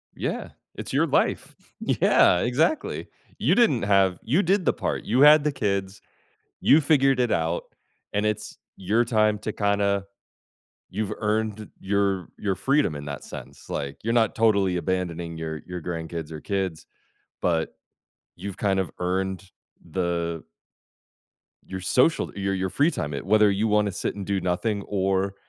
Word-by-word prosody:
Yeah. -, -, -3 dB, 0.3 s
It's -, -, -7 dB
your -, -, +3 dB
life. -, -, 0 dB, 0.2 s
Yeah, 90 Hz, -, +4 dB
exactly. 145 Hz, -, 0 dB, 0.3 s
You -, -, +3 dB
didn't 220 Hz, -, +4 dB
have 95 Hz, -3 st, +3 dB
you 145 Hz, -, +2 dB
did 185 Hz, 0 st, +2 dB
the -, -, +3 dB
part, -, -, -3 dB
you 125 Hz, +5 st, +2 dB
had 150 Hz, 0 st, +8 dB
the 150 Hz, -, +1 dB
kids, 100 Hz, -5 st, -2 dB, 0.6 s
you 155 Hz, -, +6 dB
figured 135 Hz, -3 st, +3 dB
it 120 Hz, -2 st, +1 dB
out, 80 Hz, +1 st, 0 dB, 0.5 s
and 105 Hz, +1 st, 0 dB
it's 105 Hz, 0 st, -3 dB, 0.2 s
your 105 Hz, +6 st, +1 dB
time 110 Hz, -2 st, +2 dB
to 110 Hz, -, -3 dB
kinda 100 Hz, -1 st, +1 dB, 0.9 s
you've 105 Hz, +1 st, -3 dB
earned 110 Hz, 0 st, -1 dB
your 100 Hz, -2 st, 0 dB
your 100 Hz, -2 st, -1 dB
freedom 135 Hz, -, +1 dB
in 70 Hz, 0 st, -7 dB
that 70 Hz, -1 st, -6 dB
sense, -, -, -10 dB
like, 70 Hz, 0 st, -4 dB
you're 115 Hz, +2 st, 0 dB
not 115 Hz, -3 st, +2 dB
totally 100 Hz, -5 st, +3 dB
abandoning 85 Hz, -2 st, -3 dB
your 80 Hz, -1 st, -5 dB
your 90 Hz, -1 st, -5 dB
grandkids 80 Hz, -1 st, -5 dB
or 80 Hz, -1 st, -7 dB
kids, 95 Hz, -5 st, -3 dB, 0.6 s
but 80 Hz, -2 st, 0 dB, 0.6 s
you've 95 Hz, +1 st, -6 dB
kind 95 Hz, -2 st, +1 dB
of 95 Hz, -, -3 dB
earned 95 Hz, +1 st, -2 dB, 0.4 s
the 85 Hz, -2 st, -2 dB, 1.2 s
your 95 Hz, 0 st, -6 dB
social 130 Hz, -, +2 dB
your 95 Hz, 0 st, -1 dB
your 95 Hz, 0 st, -1 dB
free 145 Hz, -, +2 dB
time 75 Hz, -, -4 dB
it 70 Hz, -, -5 dB
whether 105 Hz, +1 st, +5 dB
you 100 Hz, +3 st, +1 dB
wanna 105 Hz, -1 st, +2 dB
sit -, -, -3 dB
and 100 Hz, -2 st, -6 dB
do 100 Hz, -1 st, 0 dB
nothing 100 Hz, +4 st, -1 dB
or, 95 Hz, 0 st, 0 dB
100 Hz, 155 wpm, -25 LUFS, 90-110 Hz, 1.2 s, had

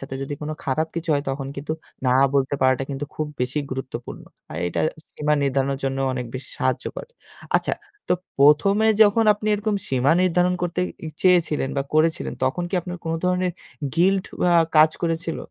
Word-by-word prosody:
সাথে 135 Hz, 0 st, -7 dB
যদি 140 Hz, +1 st, -4 dB
কোনো 155 Hz, -, -3 dB
খারাপ 155 Hz, +4 st, 0 dB
কিছু 170 Hz, 0 st, -4 dB
হয় 140 Hz, -, 0 dB
তখন 135 Hz, 0 st, -4 dB
কিন্তু 150 Hz, +3 st, -3 dB, 0.3 s
না -, -, +4 dB, 0.2 s
বলতে 140 Hz, 0 st, +2 dB
পারাটা 130 Hz, 0 st, +3 dB
কিন্তু 140 Hz, +1 st, -3 dB
খুব 155 Hz, -, -2 dB
বেশি 125 Hz, +4 st, -1 dB
গুরুত্বপূর্ণ। 130 Hz, -2 st, -6 dB, 0.3 s
আর -, -, -6 dB
এইটা 90 Hz, -, -2 dB, 0.3 s
সীমা 150 Hz, 0 st, +1 dB
নির্ধারণের 135 Hz, 0 st, 0 dB
জন্যও 135 Hz, 0 st, 0 dB
অনেক 125 Hz, -1 st, -3 dB
বেশি 130 Hz, -, -6 dB
সাহায্য -, -, 0 dB
করে। -, -, -7 dB, 0.5 s
আচ্ছা -, -, 0 dB, 0.4 s
তো -, -, +6 dB, 0.2 s
১ম 150 Hz, +8 st, +5 dB
এ -, -, +5 dB
যখন 215 Hz, +2 st, +4 dB
আপনি 210 Hz, +1 st, -7 dB
এরকম 210 Hz, 0 st, -1 dB
সীমা 135 Hz, +3 st, +3 dB
নির্ধারণ 180 Hz, 0 st, +2 dB
করতে 175 Hz, +1 st, -1 dB, 0.3 s
ই -, -, -3 dB
চেয়েছিলেন 170 Hz, -7 st, +3 dB
বা 140 Hz, -, +1 dB
করেছিলেন 160 Hz, +1 st, +1 dB
তখন 135 Hz, +7 st, 0 dB
কি -, -, -2 dB
আপনার 180 Hz, +1 st, -6 dB
কোনো 165 Hz, 0 st, -1 dB
ধরনের 180 Hz, 0 st, +1 dB, 0.4 s
গিল্ট 190 Hz, +2 st, +3 dB, 0.3 s
আ 175 Hz, -, +4 dB, 0.2 s
কাজ 155 Hz, +1 st, +7 dB
করেছিল? 165 Hz, -1 st, -1 dB
155 Hz, 180 wpm, -23 LUFS, 135-180 Hz, 0.5 s, কাজ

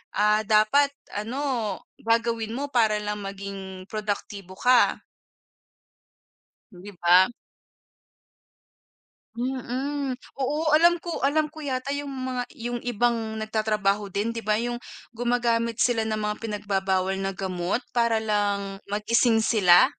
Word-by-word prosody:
ah, 210 Hz, +1 st, +3 dB
dapat 220 Hz, +7 st, +4 dB, 0.2 s
ano 230 Hz, -2 st, -2 dB, 0.2 s
gagawin 230 Hz, -1 st, 0 dB
mo 285 Hz, +2 st, -3 dB
para 220 Hz, -4 st, +3 dB
lang 210 Hz, 0 st, -3 dB
maging 195 Hz, -1 st, -7 dB
produktibo 205 Hz, -3 st, -4 dB
ka. 250 Hz, -1 st, +4 dB, 1.7 s
'Di 185 Hz, +3 st, -11 dB
ba? 180 Hz, +5 st, +6 dB, 2.0 s
Mm. 265 Hz, +3 st, -2 dB, 0.3 s
Oo 305 Hz, +3 st, +2 dB
alam 345 Hz, +2 st, +5 dB
ko 335 Hz, -5 st, -5 dB
alam 300 Hz, +2 st, +2 dB
ko 310 Hz, 0 st, -10 dB
yata 275 Hz, 0 st, -2 dB
yung 285 Hz, -1 st, -4 dB
mga 255 Hz, -2 st, -3 dB
yung 240 Hz, 0 st, -5 dB
ibang 230 Hz, -2 st, 0 dB
nagtatrabaho 210 Hz, -2 st, 0 dB
din, 215 Hz, +5 st, -1 dB
'di 230 Hz, -, -4 dB
ba 215 Hz, +1 st, +1 dB
yung 240 Hz, +1 st, -2 dB, 0.4 s
gumagamit 235 Hz, -1 st, 0 dB
sila 235 Hz, -3 st, +3 dB
ng 215 Hz, -1 st, -2 dB
mga 210 Hz, 0 st, -1 dB
pinagbabawal 195 Hz, -3 st, 0 dB
na 195 Hz, 0 st, -2 dB
gamot 185 Hz, +2 st, -2 dB, 0.2 s
para 235 Hz, -1 st, +3 dB
lang 205 Hz, -2 st, -1 dB
magising 225 Hz, +2 st, +3 dB
sila? 190 Hz, -6 st, +6 dB
220 Hz, 115 wpm, -25 LUFS, 205-245 Hz, 2.0 s, ba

